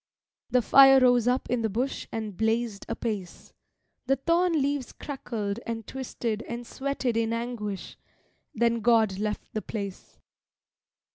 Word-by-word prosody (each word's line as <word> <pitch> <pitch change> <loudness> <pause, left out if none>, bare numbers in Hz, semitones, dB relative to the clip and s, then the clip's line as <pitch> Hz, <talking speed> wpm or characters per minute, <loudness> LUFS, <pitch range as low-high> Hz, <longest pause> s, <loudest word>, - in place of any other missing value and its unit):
The 250 -1 +3
fire 270 +1 +8
rose 245 -2 +4
up 250 +1 +1
in 245 -1 0
the 220 - 0
bush 250 +7 -2
and 220 -3 -4
blazed 225 0 -1
apace, 215 -6 -5 0.5
The 270 - +4
thorn 335 +6 +2
leaves 285 -3 0
crackled 225 -7 -4
and 225 -2 -5
twisted 235 -4 -4
and 235 +1 -5
sweated 265 -2 -2
in 230 0 +1
anguish; 230 -5 -4 0.6
Then 235 0 +2
God 220 -4 +3
left 210 0 -3
the 215 - -2
place. 200 -4 -7
235 Hz, 135 wpm, -27 LUFS, 215-255 Hz, 0.6 s, fire